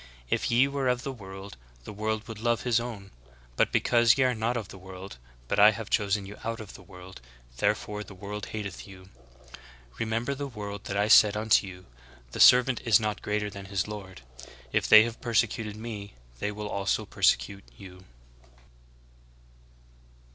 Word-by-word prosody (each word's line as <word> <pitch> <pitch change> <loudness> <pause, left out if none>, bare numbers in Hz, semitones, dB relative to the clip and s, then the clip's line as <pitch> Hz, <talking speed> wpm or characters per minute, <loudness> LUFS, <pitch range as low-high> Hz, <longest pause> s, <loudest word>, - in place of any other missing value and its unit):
If - - 0
ye 120 +3 +4
were 140 -1 -2
of 125 0 0
the 135 - -4
world 95 - -10 0.3
the - - -9
world 110 +1 -3
would 110 -2 -8
love 120 0 0
his 120 -2 +2
own; 110 -5 -7 0.4
but - - +2
because 120 -1 +3
ye 135 - +3
are 130 -1 +2
not 115 +1 -1
of 110 -4 -6
the 95 - -11
world, 95 -3 -10 0.3
but - - 0
I 105 +1 +9
have 110 -2 -8
chosen 100 -1 +1
you 105 +1 -10
out 115 0 -3
of 110 -3 -9
the - - -12
world, 90 -6 -13 0.4
there - - +2
fore 105 0 -7
the 95 -1 -13
w^orld 105 +2 -6
hateth 100 -3 -7
you. 95 -1 -14 0.9
Remember 115 +4 -1
the 140 +1 -5
word 105 -5 -7
that 100 - -3
I 105 +1 +2
said 105 -1 +6
unto 110 -2 +3
you, 90 -1 -11 0.5
The - - -7
servant 125 -1 +6
is 110 -5 +5
not 105 -2 -3
greater 105 0 -2
than 100 0 -9
his 95 -1 -2
lord. 95 -8 -9 0.5
If - - 0
they 110 0 +10
have 115 0 -6
persecuted 110 -2 0
me 105 -2 -8 0.2
they 105 - -2
will 105 0 -6
also 100 -1 -1
persecute 100 -1 +1
you." 95 -1 -13
105 Hz, 180 wpm, -27 LUFS, 100-115 Hz, 0.9 s, they